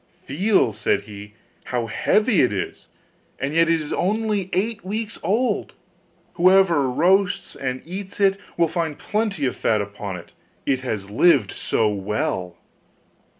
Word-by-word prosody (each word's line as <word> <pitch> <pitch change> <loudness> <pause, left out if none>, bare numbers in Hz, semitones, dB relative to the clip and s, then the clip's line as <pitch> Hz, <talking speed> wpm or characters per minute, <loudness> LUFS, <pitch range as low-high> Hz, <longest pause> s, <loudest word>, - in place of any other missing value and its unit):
'Feel,' 180 - +2
said 105 +1 0
he, 105 0 -11 0.3
'how 120 -2 -2
heavy 210 - +2
it 125 - +3
is, 95 -3 -4 0.5
and 140 +2 -3
yet 165 +1 +4
it 165 -1 +3
is 150 -1 -5
only 210 -1 0
eight 215 +3 -1
weeks 215 +4 -4
old. 225 +8 0 0.6
Whoever 175 -6 +4
roasts 180 +7 +2
and 130 -1 -4
eats 190 +4 -7
it 195 -1 +3 0.2
will 170 -1 +4
find 160 -2 -2
plenty 210 -8 -1
of 125 - -1
fat 110 - +1
upon 100 -1 -5
it, 85 - -13 0.3
it 135 -2 +1
has 105 -6 -4
lived 120 - +4
so 110 - 0
well! 100 - -2
160 Hz, 145 wpm, -22 LUFS, -, 0.6 s, yet